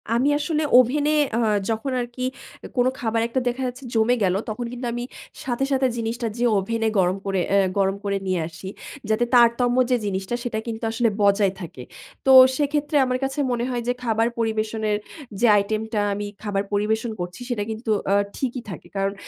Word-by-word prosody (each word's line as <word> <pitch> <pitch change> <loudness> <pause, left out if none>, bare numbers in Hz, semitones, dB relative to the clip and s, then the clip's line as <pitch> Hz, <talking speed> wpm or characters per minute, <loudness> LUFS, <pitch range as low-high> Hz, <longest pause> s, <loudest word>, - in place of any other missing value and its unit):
আমি 250 +4 +2
আসলে 300 +1 -1 0.2
ওভেনে 285 +4 +4 0.3
আ - - +2 0.3
যখন 225 +4 -1
আরকি, 240 +1 -7 0.6
কোনো 250 +1 +4
খাবার 225 -1 0
একটা 240 +3 -1
দেখা 245 +2 -1
যাচ্ছে 250 +2 -7
জমে 225 +2 +3
গেলো, 185 0 +2
তখন 220 +3 -4
কিন্তু 250 0 -5
আমি 240 0 -3 0.4
সাথে, 250 0 -1
সাথে 265 -1 +3
জিনিসটা 230 +1 -2
যেয়ে 240 0 +2
ওভেনে 225 +3 -1
গরম 185 0 +2
করে, 195 -1 0
অ্যা 200 - +5 0.2
গরম 195 0 +2
করে 200 0 0
নিয়ে 185 -1 +1
আসি। 170 +3 -10 0.4
যাতে 220 +2 +2
তারতম্য 245 +1 +4
যে - - +5
জিনিসটা, 195 +3 -2
সেটা 225 -3 -2
কিন্তু 225 0 -5
আসলে 230 +1 +2
বজায় 200 -1 +3
থাকে। 155 -7 -8 0.4
তো 265 - +5 0.3
সেক্ষেত্রে 295 +1 -1
আমার 255 0 0
কাছে 270 +2 -2
মনে 240 0 -1
হয় 245 -1 -2
যে 245 - +2
খাবার 225 -1 +2
পরিবেশনের 220 -1 0 0.4
যে 240 - +4
আইটেমটা 215 +2 -1
আমি 205 +1 -3 0.2
খাবার 200 -2 -1
পরিবেশন 220 +3 0
করছি, 175 +6 -6
সেটা 230 -4 -1
কিন্তু 220 +1 -6 0.2
আ - - +4 0.2
ঠিকই 255 -1 -2
থাকে। 180 - -8
কারণ 195 0 0
225 Hz, 180 wpm, -23 LUFS, 205-245 Hz, 0.6 s, অ্যা